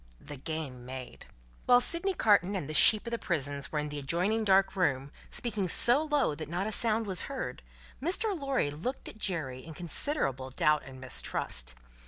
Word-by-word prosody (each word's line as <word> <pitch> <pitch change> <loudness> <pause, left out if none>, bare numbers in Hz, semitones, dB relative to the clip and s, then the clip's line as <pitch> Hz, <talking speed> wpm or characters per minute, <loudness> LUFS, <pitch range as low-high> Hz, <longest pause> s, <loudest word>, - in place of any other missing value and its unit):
The 145 - -9
Game 140 -3 -5
Made 130 0 -9 0.4
While 245 0 +7
Sydney 345 +8 0
Carton 205 - +3
and 180 -8 -3
the 155 - -5
Sheep 215 +8 +6
of 235 - -5
the 235 - -2
prisons 145 -4 -2
were 150 - -2
in 150 0 -2
the 145 0 -5
adjoining 180 +10 0
dark 195 -1 +3
room, 140 -7 0 0.2
speaking 205 -6 -1
so 245 - +6
low 295 - +1
that 155 0 -7
not 175 +4 -2
a 215 - -2
sound 225 0 +2
was 190 +2 -1
heard, 275 -1 -5 0.4
Mr. 380 +7 +1
Lorry 275 - -1
looked 185 - -5
at 220 - -11
Jerry 150 -11 -3
in 160 -1 -10
considerable 155 - -1
doubt 150 +3 +2
and 130 -1 -11
mistrust. 60 - -2
175 Hz, 185 wpm, -30 LUFS, 145-230 Hz, 0.4 s, While